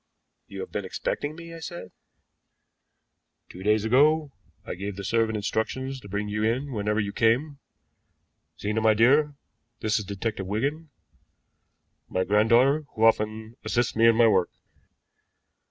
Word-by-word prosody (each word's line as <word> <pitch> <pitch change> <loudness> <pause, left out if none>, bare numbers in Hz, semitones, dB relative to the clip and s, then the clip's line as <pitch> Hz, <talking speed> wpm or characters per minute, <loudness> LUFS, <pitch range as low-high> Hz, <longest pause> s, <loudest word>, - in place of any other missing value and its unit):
"You - - -7
had 460 - -7
been - - -3
expecting 155 - -3
me?" 170 0 -10
I 165 - -9
said. 165 - -8 1.6
"Two 90 - -11
days 105 +2 +2
ago 145 +5 +3 0.3
I - - -4
gave 100 +2 -5
the 100 - -7
servant 115 +2 +1
instructions 130 +6 -2
to 100 - -13
bring 105 +2 -3
you 105 +1 -2
in 130 +6 0
whenever 105 0 -1
you 100 -1 -2
came. 130 +6 +1 1.0
Zena, 105 +2 -1
my 110 -1 +4
dear, 145 +6 +4 0.5
this 110 0 +1
is 105 - -6
Detective 100 0 -4
Wigan 140 +10 -2 1.2
my 95 - 0
granddaughter 120 +9 +3
who 110 - -1
often 110 +1 +1
assists 120 -1 0
me 115 +1 +5
in 115 - +5
my 115 0 +5
work." 95 -5 +3
110 Hz, 145 wpm, -26 LUFS, 105-135 Hz, 1.6 s, me